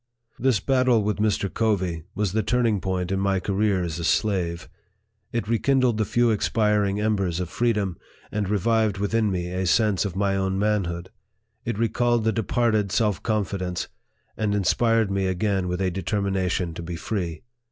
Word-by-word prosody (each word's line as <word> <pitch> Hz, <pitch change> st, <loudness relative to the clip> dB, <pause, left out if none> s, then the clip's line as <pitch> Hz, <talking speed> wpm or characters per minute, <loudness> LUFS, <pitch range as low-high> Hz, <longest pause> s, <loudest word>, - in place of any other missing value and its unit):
This 130 Hz, -4 st, +2 dB
battle 130 Hz, 0 st, +2 dB
with 105 Hz, +1 st, -1 dB
Mr. 105 Hz, -2 st, +1 dB
Covey 95 Hz, -8 st, 0 dB
was 100 Hz, -2 st, 0 dB
the 110 Hz, +3 st, +1 dB
turning 115 Hz, -4 st, +1 dB
point 95 Hz, -1 st, -2 dB
in 95 Hz, -, 0 dB
my 95 Hz, -1 st, +1 dB
career 100 Hz, -1 st, +1 dB
as 85 Hz, -1 st, -4 dB
a -, -, -4 dB
slave. 90 Hz, -2 st, 0 dB, 0.6 s
It 115 Hz, -3 st, -2 dB
rekindled 120 Hz, +1 st, +2 dB
the 110 Hz, -, +2 dB
few 120 Hz, +1 st, +2 dB
expiring 105 Hz, -2 st, +1 dB
embers 100 Hz, -5 st, 0 dB
of 90 Hz, -2 st, -3 dB
freedom, 105 Hz, -7 st, 0 dB, 0.3 s
and 105 Hz, -2 st, -2 dB
revived 110 Hz, 0 st, +1 dB
within 105 Hz, +2 st, +1 dB
me 90 Hz, -2 st, -2 dB
a 90 Hz, 0 st, -1 dB
sense 105 Hz, -2 st, +3 dB
of 100 Hz, -4 st, -4 dB
my 100 Hz, 0 st, +1 dB
own 95 Hz, 0 st, 0 dB
manhood. 95 Hz, -4 st, -1 dB, 0.5 s
It 120 Hz, -3 st, -2 dB
recalled 115 Hz, +1 st, +1 dB
the 110 Hz, -, +2 dB
departed 110 Hz, -2 st, +1 dB
self 105 Hz, -4 st, +1 dB
con 110 Hz, -2 st, +1 dB
fidence, 90 Hz, -2 st, -4 dB, 0.5 s
and 105 Hz, -2 st, 0 dB
inspired 115 Hz, +2 st, +2 dB
me 95 Hz, -1 st, 0 dB
again 95 Hz, 0 st, 0 dB
with 90 Hz, 0 st, -2 dB
a 95 Hz, -1 st, 0 dB
determination 95 Hz, -2 st, -1 dB
to 85 Hz, -, -7 dB
be 85 Hz, 0 st, -5 dB
free. 85 Hz, -3 st, -4 dB
100 Hz, 170 wpm, -24 LUFS, 95-110 Hz, 0.6 s, sense